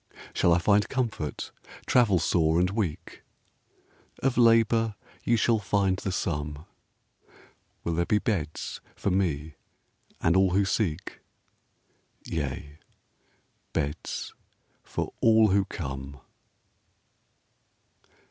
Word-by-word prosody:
Shall 85 - +3
I 85 - +5
find 100 +3 +3
comfort, 110 - -3 0.3
travel 115 -7 +4
sore 80 -1 +2
and 90 +1 +2
weak? 100 -7 -3 1.0
Of 135 -1 +2
labor 115 -2 +4 0.3
you 120 - +3
shall 115 0 +3
find 100 -2 +1
the 95 - -3
sum. 75 -4 -3 1.2
Will 85 - -1
there 85 +1 0
be 105 - +3
beds 95 - -3
for 100 - -1
me 80 -5 0 0.7
and 85 +2 +2
all 95 -1 +4
who 100 0 +3
seek? 95 -4 -2 1.1
Yea, 75 0 -4 0.9
beds 75 0 -3 0.5
for - - -4
all 110 -1 +6
who 100 0 +3
come. 70 -4 -6
95 Hz, 100 wpm, -27 LUFS, 80-105 Hz, 1.2 s, all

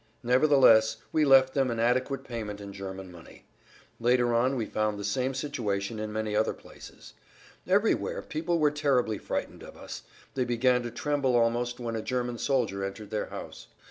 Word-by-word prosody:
Nevertheless 125 -4 +5
we 155 -1 +3
left 135 -1 +6
them 135 -2 +1
an 115 -1 -2
adequate 130 +3 +1
payment 110 -5 -6
in 100 -1 -8
German 95 -1 -7
money. 85 -2 -15 0.5
Later 120 0 +2
on 125 +3 +2
we 115 -4 -1
found 110 -1 -1
the 100 - -6
same 130 +6 -1
situation 110 -7 -3
in 110 0 -4
many 110 -1 -2
other 110 +1 +1
places. - - -14 0.5
Everywhere - - +1
people 170 +2 -2
were 150 -2 +3
terribly 135 -7 +1
frightened - - -4
of - - -12
us; - - -8 0.3
they 130 - 0
began 125 +1 +2
to 120 - -4
tremble 140 -1 0
almost 120 +1 +1
when 115 -2 -4
a 110 - -2
German 120 -1 -3
soldier 120 -8 0
entered 100 +2 -6
their 110 - -2
house. - - -9
120 Hz, 175 wpm, -28 LUFS, 110-130 Hz, 0.5 s, left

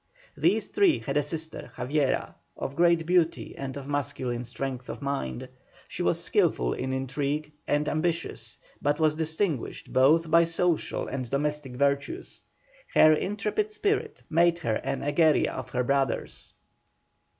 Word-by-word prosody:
These - - +2
three 390 -6 +4
had 135 - -4
a 145 - +4
sister, 160 +1 -5
Javiera, 135 +2 0 0.2
of 135 - -4
great 170 0 +3
beauty 175 -1 +1
and 135 0 -5
of 140 -1 -7
masculine 130 -4 -2
strength 130 0 -5
of - - -5
mind; 140 - -3 0.4
she - - -6
was - - +2
skilful - - +2
in 130 +1 -3
intrigue 140 +3 -2 0.2
and 145 +1 +1
ambitious, 170 +2 -2 0.2
but 145 +2 +1
was 155 -1 +3
distinguished 160 - -2
both 155 +5 +4
by 170 +1 +7
social 165 0 0
and 130 -3 -4
domestic 145 -1 -2
virtues; 140 - -1 0.5
her 155 0 +8
intrepid 210 - -1
spirit 425 -1 -1
made 170 +1 +3
her 115 -10 -1
the 135 - -2
Egeria 155 +1 +3
of 130 - -6
her 125 - 0
brothers. 135 0 -1
145 Hz, 140 wpm, -27 LUFS, 135-165 Hz, 0.5 s, her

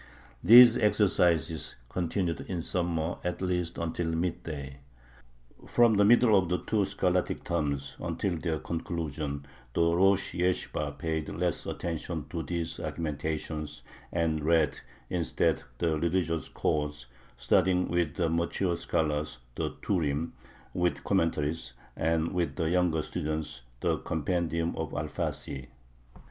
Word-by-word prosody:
These 120 +5 +10
exercises 85 -7 +2
continued 85 +2 -1
in 85 -3 -2
summer 85 -2 -1
at 90 0 -2
least 90 -2 -1
until 85 0 -2
midday. 80 -5 -3 0.9
From 120 -2 +5
the 100 -1 +4
middle 115 0 +6
of 95 -3 +3
the 90 - +2
two 105 0 0
scholastic 90 -2 0
terms 70 -5 -2
until 95 -3 -1
their 80 -1 -1
conclusion 75 -3 -4 0.3
the 85 0 +3
rosh 95 +2 +3
yeshibah 80 -5 -1
paid 80 +1 -2
less 90 0 -1
attention 80 -2 -4
to 85 - -2
these 85 0 -3
argumentations, 75 -1 -4 0.3
and 80 -3 0
read 80 -2 +3 0.3
instead 85 -3 +1 0.2
the 80 0 +1
religious 85 -2 0
codes, 75 -3 -1 0.3
studying 90 +7 +3
with 85 -4 0
the 85 - +1
mature 85 +2 0
scholars 75 -5 -1 0.2
the - - -2
Turim 80 -4 0 0.4
with 90 -1 0
commentaries, 80 -7 0 0.2
and 80 0 +1
with 85 -6 -1
the 80 -2 0
[younger] 90 -3 +2
students 75 -6 -3 0.2
the - - +1
compendium 85 +1 -1
of 80 -1 -3
Alfasi.... 75 -3 -3
85 Hz, 120 wpm, -29 LUFS, 75-90 Hz, 0.9 s, These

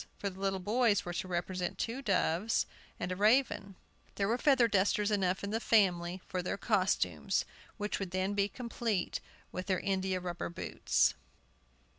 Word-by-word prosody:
For 200 - -3
the 185 - -13
little 195 0 0
boys 210 +2 +2
were 175 - -4
to 180 - -3
represent 180 0 -2
two 235 +4 -2
doves 195 -2 +1 0.3
and 180 - -3
a - - -1
raven. 210 -1 +2 0.4
There 195 - 0
were 235 +4 +1
feather 265 -5 +5
dusters 205 0 +2
enough 190 -2 +1
in 200 - -3
the 225 - 0
family 185 -5 +2
for 185 - -2
their 180 - -2
costumes, 185 - +1 0.3
which 210 0 -2
would 195 -2 -3
be 185 - -3
then 200 +2 +1
complete 230 -5 -2 0.3
with 185 - -5
their 185 -2 +1
india 190 -1 0
rubber 175 -1 -4
boots. 170 - +1
195 Hz, 165 wpm, -32 LUFS, 185-210 Hz, 0.4 s, feather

